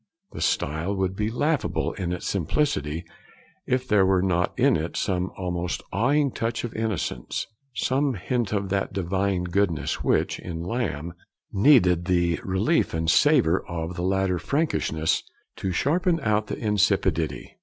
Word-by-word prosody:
The - - -7
style 80 +7 0
would 95 -1 -1
be 105 +2 -1
laughable 145 +5 0
in 90 -2 -3
its 90 - -4
simplicity 85 - -1 0.6
if 130 0 0
there 105 -2 +4
were 95 -1 +3
not 90 -2 +1
in - - +4
it 80 +1 -3
some 90 -1 -1
almost 90 -1 -3
awing 140 +7 +2
touch 115 0 -2
of 120 - -4
innocence; 110 - -2 0.3
some 135 +1 +1
hint 115 +2 -2
of 100 -2 -1
that 95 0 -1
divine 95 0 0
goodness 90 -2 0
which, - - +1
in 85 -2 -5
Lamb, 85 - -3 0.4
needed 95 - +5
the 85 -2 +1
relief 95 - +1
and 80 0 +2
savour 125 - +4
of 85 0 -4
the 85 - -4
later 95 0 +1
freakishness 110 - 0 0.4
to 95 - -2
sharpen 165 - +1
it 165 - -8
out 105 0 +1
of - - -3
insipidity. 95 - 0
95 Hz, 150 wpm, -25 LUFS, 85-115 Hz, 0.6 s, needed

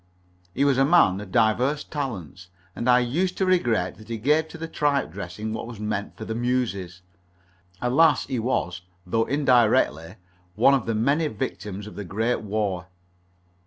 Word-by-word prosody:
He 140 - +2
was 135 -2 +3
a - - +5
man 135 - +4
of 100 -3 -10
diverse 125 +7 +2
talents, 95 - -6 0.3
and 120 - -1
I 125 - +7
used 160 +10 0
to 190 - +1
regret 120 - +1
that 110 - -14
he 115 - -3
gave 150 +8 +2
to 160 - -10
the 165 0 -5
tripe 145 - 0
dressing 100 +4 -6
what 110 - -5
was 115 -3 -9
meant 105 -1 -4
for 110 - -7
the 110 - -3
muses. 110 -7 -2 0.8
Alas, 145 +6 +4
he 130 -3 -3
was, 90 -7 -1 0.2
though 115 +5 +1
indirectly, 120 - +2 0.4
one 125 +6 +5
of 130 -5 0
the 115 - 0
many 140 +8 +2
victims 105 -4 -5
of 105 - -10
the 105 - -5
Great 110 +7 -1
War. 100 -4 -2
115 Hz, 170 wpm, -24 LUFS, 100-140 Hz, 0.8 s, I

